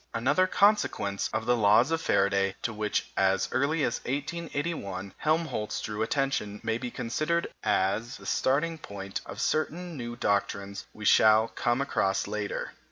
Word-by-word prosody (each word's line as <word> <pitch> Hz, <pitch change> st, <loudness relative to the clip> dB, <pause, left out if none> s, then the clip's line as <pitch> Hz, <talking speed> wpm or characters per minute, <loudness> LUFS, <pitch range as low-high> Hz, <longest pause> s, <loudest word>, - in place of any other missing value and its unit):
Another 130 Hz, +11 st, +3 dB
consequence 190 Hz, -, +2 dB
of 110 Hz, +1 st, -2 dB
the 125 Hz, +1 st, +3 dB
laws 115 Hz, +5 st, +4 dB
of 165 Hz, 0 st, 0 dB
Faraday, 95 Hz, -4 st, +2 dB
to 120 Hz, -, -1 dB
which, 105 Hz, 0 st, -2 dB
as 95 Hz, 0 st, +2 dB
early 145 Hz, +3 st, +1 dB
as 120 Hz, -, 0 dB
1881, 140 Hz, -, -3 dB
Helmholtz 155 Hz, -9 st, -1 dB
drew 105 Hz, 0 st, -4 dB
attention, 115 Hz, -4 st, -1 dB
may 115 Hz, +1 st, -1 dB
be 125 Hz, -, -4 dB
considered 155 Hz, +9 st, -1 dB, 0.2 s
as 110 Hz, +7 st, 0 dB
the -, -, -14 dB
starting 155 Hz, +5 st, +1 dB
point 100 Hz, -5 st, -6 dB
of -, -, -7 dB
certain 170 Hz, +2 st, -1 dB
new 120 Hz, -3 st, -5 dB
doctrines 100 Hz, -2 st, -1 dB
we 105 Hz, -, -9 dB
shall 110 Hz, +2 st, +6 dB
come 120 Hz, +2 st, 0 dB
across 95 Hz, -8 st, 0 dB
later. 105 Hz, 0 st, -3 dB
115 Hz, 150 wpm, -28 LUFS, 100-145 Hz, 0.2 s, shall